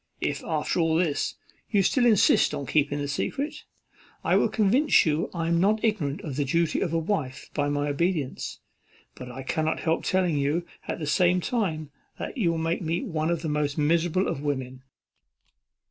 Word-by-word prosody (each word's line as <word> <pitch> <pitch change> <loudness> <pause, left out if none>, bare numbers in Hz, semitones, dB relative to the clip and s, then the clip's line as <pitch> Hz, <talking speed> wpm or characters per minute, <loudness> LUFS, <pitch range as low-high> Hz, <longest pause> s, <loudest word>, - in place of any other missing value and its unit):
If - - -2
after - - -1
all 165 -1 +2
this, 160 -4 0 0.3
you 200 -3 +3
still 245 +5 +3
insist 210 -8 +4
on 140 -1 -4
keeping 145 0 +1
the 145 0 -2
secret, 275 - -3 0.6
I - - +2
will - - +3
convince 230 +8 +4
you 155 0 0
I 165 -2 -2
am 170 0 +2
not 210 +4 +2
ignorant 170 -11 0
of 145 -5 -6
the 145 - +2
duty 165 +4 +1
of 175 - 0
a 165 - +1
wife 160 -6 -3
by 145 -1 0
my 145 0 0
obedience; 150 -2 -2 0.5
but 125 - -9
I 135 +2 -7
cannot 155 +3 -1
help 165 0 0
telling 180 -5 +1
you 150 +5 0 0.2
at - - -2
the 155 - -4
same 180 +4 +3
time 170 - -2 0.4
you 210 -10 +1
will 165 - 0
make 165 +1 -1
me 170 +4 -1
one 160 - -1
of 170 -1 -1
the 160 - -2
most 150 0 -1
miserable 170 +4 +2
of 135 - -3
women." 130 -3 -3
160 Hz, 185 wpm, -26 LUFS, 145-180 Hz, 0.6 s, insist